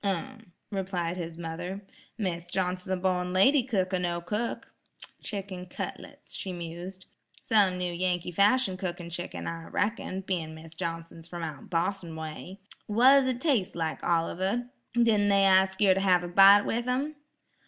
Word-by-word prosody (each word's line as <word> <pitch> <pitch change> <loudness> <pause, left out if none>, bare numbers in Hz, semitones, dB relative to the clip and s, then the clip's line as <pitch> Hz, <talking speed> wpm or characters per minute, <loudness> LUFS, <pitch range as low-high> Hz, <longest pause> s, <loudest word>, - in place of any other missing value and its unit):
"Um," 205 +1 -4 0.2
replied 185 -3 -2
his 165 -2 -5
mother, 175 +4 -5 0.3
"Mis' 175 -5 -3
Johnson's 180 0 -2
a 185 - +1
born 180 -1 0
lady 265 +10 +5
cook 195 -7 -1
or 185 - +2
no 175 -1 -1
cook. 210 +7 -4 0.5
Chicken 195 -3 -5
cutlets," - - -8
she 190 - -5
mused. 175 +2 -7 0.4
"Some 200 -4 +3
new 180 -1 -2
Yankee 180 0 -1
fashion 200 +2 +3
cookin' 175 -2 -5
chicken, 175 +1 -5
I 165 0 -5
reckon, 205 -2 -2
bein' 170 -5 -3
Mis' 160 0 -11
Johnson's 165 0 -6
from 170 -1 -6
out 150 -4 -6
Bos'n 170 0 -1
way. 160 +4 -7 0.3
Wha's 260 +5 +6
it 255 -2 -1
taste 255 - +1
like, 165 -2 -3
Oliver, 190 +8 0 0.2
didn't 220 -4 +4
they 200 0 +4
ask 190 0 +4
yer 200 -3 +6
to 190 - 0
have 185 -2 +3
a - - -4
bite 195 +3 +7
with 240 +2 -1
'em"? 275 +5 -1
185 Hz, 160 wpm, -28 LUFS, 170-205 Hz, 0.5 s, bite